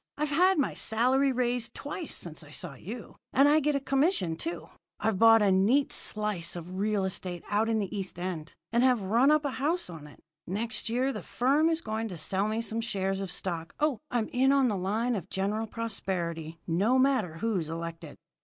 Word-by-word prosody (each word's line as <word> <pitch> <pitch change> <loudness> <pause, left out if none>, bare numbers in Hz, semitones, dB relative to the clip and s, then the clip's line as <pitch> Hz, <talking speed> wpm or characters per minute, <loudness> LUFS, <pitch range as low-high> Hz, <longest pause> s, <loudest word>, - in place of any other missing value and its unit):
"I've 300 0 -1
had 365 +6 +4
my 285 - +1
salary 255 +5 +2
raised 245 -2 -1
twice 300 +3 -5
since 160 -2 -5
I 150 - -14
saw 150 +1 -5
you, 215 - -9 0.2
and 275 +2 +6
I 300 +2 +5
get 300 0 +1
a - - +2
commission, 275 - +1
too. 330 - -5 0.3
I've 220 -4 0
bought 225 -1 +7
a 200 - +4
neat 220 +10 +3
slice 210 -6 -1
of 180 +2 -6
real 205 -1 +1
estate 180 -2 -4
out 215 +2 +2
in 225 - +2
the 205 -1 -3
East 190 -3 -5
End, 175 -3 -5 0.2
and 235 +1 +3
have 250 -5 +3
run 235 +8 +3
up 305 0 +3
a 285 - 0
house 325 - 0
on 155 -3 -9
it. 150 - -16 0.3
Next 220 +4 -1
year 255 +4 +1
the - - -5
firm 285 +6 +2
is 330 0 0
going 220 -2 -3
to 180 -5 -7
sell 195 +5 +1
me 220 +1 -1
some 230 0 -1
shares 195 -4 -1
of 195 - -4
stock. 165 -3 -3
Oh, 300 -5 +1
I'm 240 -4 0
in 265 +2 +3
on 275 -2 +4
the 210 - 0
line 215 +6 0
of 190 -4 -4
General 210 +3 -1
Prosperity, 175 -8 -3
no 200 +10 +2
matter 255 -11 +2
who's 185 -4 -1
elected!" 165 -1 -6
220 Hz, 205 wpm, -29 LUFS, 185-260 Hz, 0.3 s, bought